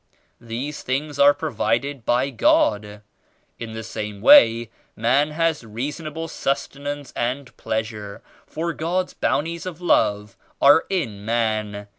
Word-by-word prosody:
These 120 Hz, +6 st, -5 dB
things 140 Hz, +2 st, -3 dB
are 140 Hz, 0 st, +8 dB
provided 140 Hz, -2 st, -2 dB
by 125 Hz, +3 st, +1 dB
God. 105 Hz, -3 st, +1 dB, 0.6 s
In 115 Hz, -1 st, -6 dB
the 110 Hz, 0 st, -6 dB
same 105 Hz, -2 st, -6 dB
way 115 Hz, +1 st, +6 dB, 0.2 s
man 135 Hz, +7 st, +2 dB
has 160 Hz, -2 st, 0 dB
reasonable 150 Hz, +8 st, -5 dB
sus 140 Hz, -3 st, -1 dB
tenance 145 Hz, -1 st, -7 dB
and 125 Hz, +3 st, -3 dB
pleasure, 110 Hz, -2 st, -4 dB, 0.2 s
for 170 Hz, +1 st, -3 dB
God's 180 Hz, +4 st, -2 dB
Bounties 170 Hz, +4 st, -1 dB
of 175 Hz, -3 st, -7 dB
Love 105 Hz, -, +1 dB, 0.2 s
are 145 Hz, +3 st, +6 dB
in 115 Hz, -, -2 dB
man. 110 Hz, -2 st, -1 dB
130 Hz, 125 wpm, -22 LUFS, 110-150 Hz, 0.6 s, are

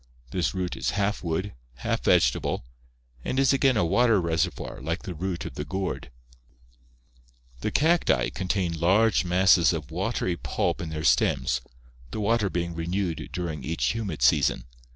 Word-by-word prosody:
This 90 Hz, +1 st, -1 dB
root 90 Hz, -1 st, -2 dB
is -, -, -1 dB
half 105 Hz, 0 st, 0 dB
wood, 90 Hz, +4 st, -2 dB, 0.2 s
half -, -, -2 dB
vegetable, -, -, +2 dB, 0.6 s
and 130 Hz, -, -1 dB
is 135 Hz, -1 st, +4 dB
again 135 Hz, -3 st, +3 dB
a 90 Hz, -, +3 dB
water 110 Hz, +4 st, +3 dB
reservoir 85 Hz, -5 st, -2 dB
like 80 Hz, +5 st, -3 dB
the 95 Hz, -5 st, -5 dB
root 90 Hz, +2 st, -4 dB
of -, -, -6 dB
the 75 Hz, -, -4 dB
gourd." 95 Hz, -4 st, -4 dB, 1.5 s
The 85 Hz, -, -1 dB
cacti 165 Hz, +9 st, +3 dB
(see -, -, -4 dB
PL -, -, 0 dB
V) -, -, -1 dB
contain 90 Hz, -2 st, -1 dB
large 100 Hz, +5 st, +3 dB
masses 90 Hz, -1 st, +4 dB
of 75 Hz, -3 st, -5 dB
watery 90 Hz, 0 st, -1 dB
pulp -, -, -1 dB
in 85 Hz, -, -4 dB
their 80 Hz, 0 st, -4 dB
stems, -, -, +2 dB, 0.5 s
the 65 Hz, -, -5 dB
water 105 Hz, -1 st, +1 dB
being 85 Hz, -1 st, -2 dB
renewed 85 Hz, +1 st, -3 dB
during 80 Hz, -6 st, -4 dB
each 80 Hz, +5 st, 0 dB
humid 100 Hz, -, -3 dB
season. 60 Hz, -, +3 dB
90 Hz, 165 wpm, -26 LUFS, 80-105 Hz, 1.5 s, is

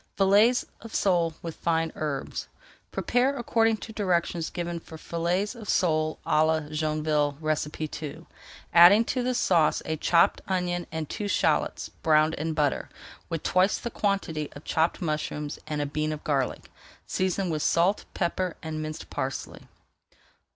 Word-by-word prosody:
FILLETS 205 Hz, +5 st, +4 dB, 0.2 s
OF 230 Hz, -, -9 dB
SOLE 170 Hz, -4 st, +2 dB
WITH 165 Hz, -1 st, -4 dB
FINE 165 Hz, -1 st, 0 dB
HERBS 145 Hz, -3 st, -4 dB, 0.4 s
Prepare 255 Hz, +3 st, +1 dB
according 225 Hz, -2 st, +2 dB
to 220 Hz, -, -9 dB
directions 175 Hz, -5 st, 0 dB
given 175 Hz, -1 st, -4 dB
for 160 Hz, -1 st, -11 dB
Fillets 175 Hz, +6 st, -1 dB
of 230 Hz, -4 st, -10 dB
Sale 155 Hz, -3 st, +1 dB
à 155 Hz, +1 st, +3 dB
la 160 Hz, 0 st, +2 dB
Joinville 155 Hz, -2 st, 0 dB, 0.6 s
II, 155 Hz, +2 st, -7 dB, 0.5 s
adding 180 Hz, +6 st, +8 dB
to 255 Hz, -, -1 dB
the 250 Hz, 0 st, 0 dB
sauce 170 Hz, -9 st, +3 dB
a 160 Hz, 0 st, -2 dB
chopped 170 Hz, +2 st, +3 dB
onion 180 Hz, -2 st, -1 dB
and 160 Hz, -1 st, -3 dB
two 210 Hz, +5 st, -4 dB
shallots -, -, +1 dB
browned 155 Hz, -1 st, +2 dB
in 160 Hz, +2 st, -2 dB
butter, 150 Hz, -3 st, 0 dB, 0.4 s
with 165 Hz, -2 st, -3 dB
twice 185 Hz, +2 st, +3 dB
the 235 Hz, -, -5 dB
quantity 195 Hz, -9 st, -1 dB
of 145 Hz, -, -11 dB
chopped 165 Hz, +3 st, 0 dB
mushrooms, 150 Hz, -2 st, -3 dB
and 150 Hz, -1 st, -1 dB
a -, -, -2 dB
bean 155 Hz, +2 st, -2 dB
of 155 Hz, -1 st, -6 dB
garlic. 135 Hz, -4 st, -1 dB, 0.3 s
Season 185 Hz, -1 st, -1 dB
with 155 Hz, -1 st, -1 dB
salt, 180 Hz, +7 st, +2 dB
pepper, 180 Hz, -1 st, -1 dB
and 155 Hz, -1 st, -4 dB
minced 155 Hz, 0 st, -6 dB
parsley. -, -, -4 dB
165 Hz, 150 wpm, -27 LUFS, 155-190 Hz, 0.6 s, adding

